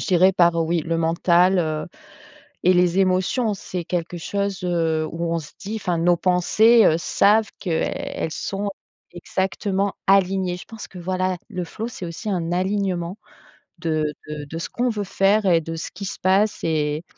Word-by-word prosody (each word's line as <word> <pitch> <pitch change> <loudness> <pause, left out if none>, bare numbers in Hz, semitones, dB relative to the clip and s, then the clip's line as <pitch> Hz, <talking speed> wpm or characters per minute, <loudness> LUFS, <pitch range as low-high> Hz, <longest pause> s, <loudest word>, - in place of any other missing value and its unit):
je - - -4
dirais 185 0 +5
par 170 -2 +4
oui 165 +1 0
le 165 +2 -2
mental, 175 +3 +3
heu, 155 -2 -1 0.8
et 185 - +6
les 180 +1 +3
émotions, 195 +4 +2
c'est 180 -2 -5
quelque 175 0 -3
chose, 200 +2 -3
heu, 165 -3 0
où 165 0 -2
on 170 - +1
se 155 -2 -10
dit, 205 +3 -4
enfin 180 -5 -1
nos 175 +1 +3
pensées, 210 +6 +4
heu, 160 - +5
savent 210 +5 +3
que, 180 - -4
elles 160 0 -2
sont 200 +3 -3 0.4
exactement 190 +2 -2
alignées. 190 -2 +3
Je - - -10
pense 225 -1 -9
que 180 - -11
voilà, 185 +1 -1
le 185 -4 -4
flow 220 +7 -6
c'est 205 -6 -8
aussi 170 +6 -6
un 175 -4 -1
alignement 185 -1 -1 0.6
de 160 -3 0 0.2
de 150 -1 -6
de 160 +3 -7
ce 170 - -4
qu'on 245 +1 0
veut 210 -3 -2
faire 200 +2 +2
et 170 -3 +5
de 165 +1 -6
ce 160 - -5
qui 200 - -6
se - - -6
passe 195 +3 +2
et 155 -1 0
180 Hz, 180 wpm, -22 LUFS, 170-195 Hz, 0.8 s, et